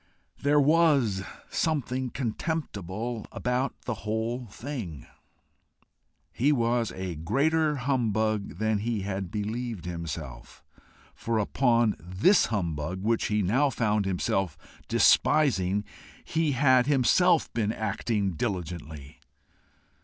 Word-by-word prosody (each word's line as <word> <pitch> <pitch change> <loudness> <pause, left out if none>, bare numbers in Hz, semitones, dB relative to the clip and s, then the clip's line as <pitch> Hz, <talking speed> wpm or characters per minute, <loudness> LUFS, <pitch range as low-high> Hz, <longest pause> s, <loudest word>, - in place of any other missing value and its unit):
There 145 +1 +4
WAS 145 - +3 0.3
something 130 -5 -1
contemptible 115 - -4
about 125 +2 -2
the 125 - -3
whole 115 +3 -2
thing. 100 - -7 1.3
He 140 +5 +2
was 120 -3 +1
a 95 -1 -4
greater 150 - +1
humbug 110 -7 0
than 110 0 +1
he 110 0 -2
had 95 -1 -3
believed 110 -1 -4
himself, 80 -6 -7 0.5
for 115 -1 -2
upon 115 0 +2
this 95 - +3
humbug 90 -3 -3
which 115 +1 +1
he 105 -1 +1
now 130 +10 +2
found 105 -5 0
himself 95 -2 -1 0.3
despising 105 -10 +3 0.4
he 160 -2 0
had 130 -1 +4
himself 150 +5 +3
been 110 -3 0
acting 105 -2 -1
diligently! 80 - -5
110 Hz, 100 wpm, -27 LUFS, 95-130 Hz, 1.3 s, There